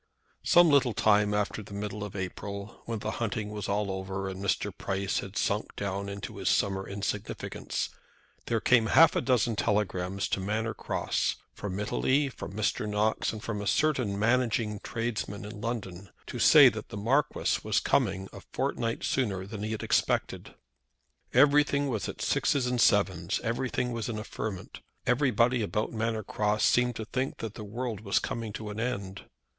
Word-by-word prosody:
Some 175 0 +6
little 135 -5 +4
time 105 -1 +3
after 105 +1 -1
the 100 0 -10
middle 105 0 -4
of 105 -1 -7
April, 100 +3 -6
when 115 -1 -3
the 105 - -3
hunting 105 -1 -2
was 105 -2 -5
all 100 0 0
over, 95 0 -4
and 95 +1 -6
Mr. 100 - 0
Price 95 0 -1
had 100 +1 -7
sunk 105 +2 -1
down 100 0 -3
into 100 0 -6
his - - 0
summer 95 -1 +1
insignificance, 100 +1 -3 0.6
there 115 - +1
came 115 -1 +4
half 165 +7 +6
a - - +2
dozen 120 -3 +2
telegrams 100 -3 0
to - - 0
Manor 110 +3 -1
Cross, - - -1 0.2
from 100 -1 -5
Italy, 135 +7 +1
from 95 -8 -8
Mr. 105 0 0
Knox, 105 +1 +1
and 110 -1 -8
from 105 -3 -3
a 100 - -4
certain 130 -10 +1
managing 110 -1 +1
tradesman 110 -3 -3
in 105 0 -8
London, 100 -5 -4 0.2
to - - -6
say - - +9
that - - -2
the - - -6
Marquis 130 +8 +1
was - - +2
coming 95 0 +1
a - - -9
fortnight 115 -1 -1
sooner 100 -8 0
than 100 +1 -7
he 110 +1 -3
had 110 - -3
expected. - - 0 0.8
Everything 145 +1 +4
was 110 -5 -2
at - - -5
sixes 140 -3 +2
and 125 -1 +1
sevens. 95 -3 +2
Everything 125 +1 -1
was 115 0 -3
in 110 - -3
a 105 - -4
ferment. 105 -4 -6 0.3
Everybody 125 -2 +3
about 105 +2 -1
Manor 110 -1 -1
Cross 105 +1 0
seemed 125 -1 +3
to 110 - -5
think 130 +4 -2
that 110 -2 -5
the 110 - -8
world 115 +1 -4
was 100 -2 0
coming 115 -2 -2
to 105 0 -5
an 105 - -6
end. 100 -5 -3
105 Hz, 175 wpm, -29 LUFS, 100-120 Hz, 0.8 s, say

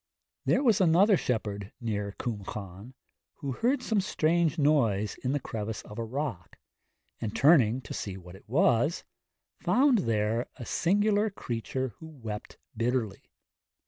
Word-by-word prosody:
There - - +3
was 225 -7 +4
another 185 +4 +5
shepherd 105 - -2
near 105 -3 -3
Cwm 105 -5 -4
Llan, 100 +5 -8 0.4
who 140 - -4
heard 245 - 0
some 215 -3 +1
strange 170 -2 +1
noise 115 -9 +2
in 130 +2 0
a - - +1
crevice 110 -3 -5
of 105 - -9
a - - -1
rock, 115 - -4 0.6
and 110 0 -4
turning 130 -2 +5
to 110 - -8
see 95 -2 -4
what 90 -1 -12
it 100 - -17
was, 150 - +2 0.6
found 265 -3 +4
there 115 - 0
a 120 - -8
singular 205 - +2
creature 130 - -3
who 160 - -9
wept 115 -9 -7 0.2
bitterly. 115 -2 -1
125 Hz, 145 wpm, -29 LUFS, 105-165 Hz, 0.6 s, another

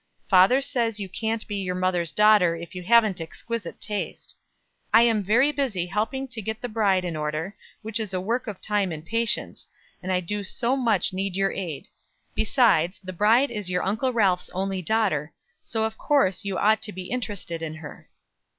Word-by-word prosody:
Father 195 +8 +5
says 230 -5 -1
you 200 - -4
can't 220 +4 -2
be 205 - -3
your 185 -2 -2
mother's 180 -2 0
daughter 210 -5 +5
if 170 0 -9
you 180 - -6
haven't 215 -2 +4
exquisite 200 +3 -5
taste. 210 -1 -4 0.6
I 230 - +7
am 225 -3 +3
very 235 +9 +3
busy 250 -12 -1
helping 220 +8 -2
to 235 -2 -4
get 220 +2 -4
the 245 - -4
bride 200 -5 +1
in 170 -2 -3
order, 155 +5 -3 0.3
which 220 +1 -2
is 215 -3 -3
a 185 - -1
work 235 +7 -2
of 205 -3 -6
time 205 -3 0
and 155 0 -7
patience; 230 +3 -2 0.3
and 185 +1 -3
I 180 - +2
do 205 +4 -4
so 240 +6 0
much 225 -9 +1
need 190 0 -2
your 195 0 +2
aid; 170 -7 -5 0.5
besides, 205 - +2
the 185 0 -6
bride 225 +9 +3
is 210 -5 -3
your 180 0 0
Uncle 220 +7 0
Ralph's 195 -6 +1
only 190 0 -2
daughter, 185 -7 0 0.3
so 220 -1 -2
of 220 0 -3
course 225 - +2
you 195 -2 -3
ought 215 +1 +3
to 210 - -5
be 185 -1 -8
interested 205 -9 -4
in 160 -1 -4
her. 160 -2 -11
205 Hz, 190 wpm, -25 LUFS, 180-225 Hz, 0.6 s, I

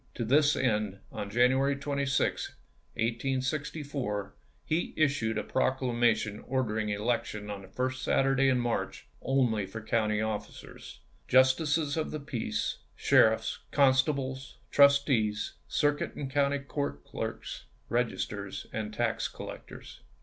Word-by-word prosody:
To 120 - -2
this 145 +4 +4
end, 105 -5 0
on 100 - -5
January 130 +5 +3
26, 140 -1 -1 0.4
1864, 130 -1 -2 0.3
he 160 +3 -1
issued 135 -8 +1
a 105 - -1
proclamation 120 -5 +1
order 125 -4 -1
ing 105 -1 -1
an 105 - -2
election 105 -2 -2
on 100 -1 -6
the 95 - -12
first 130 +5 -2
Saturday 135 0 +3
in 130 - +3
March, 120 -1 -2 0.2
only 120 -7 +1
for 110 +4 -7
county 110 -1 0
officers, 110 -1 -6 0.3
"Justices 145 +4 +3
of 160 - -1
the 155 - -4
peace, 130 -5 -3 0.2
sheriffs, - - +3
constables, 135 -1 +1
trustees, 140 -7 +4
circuit 145 0 0
and 135 -2 -5
county 140 0 +2
court 140 - -4
clerks, - - -5 0.2
registers - - -2
and 110 -1 -3
tax - - 0
collectors." - - -10
130 Hz, 120 wpm, -30 LUFS, 110-140 Hz, 0.4 s, this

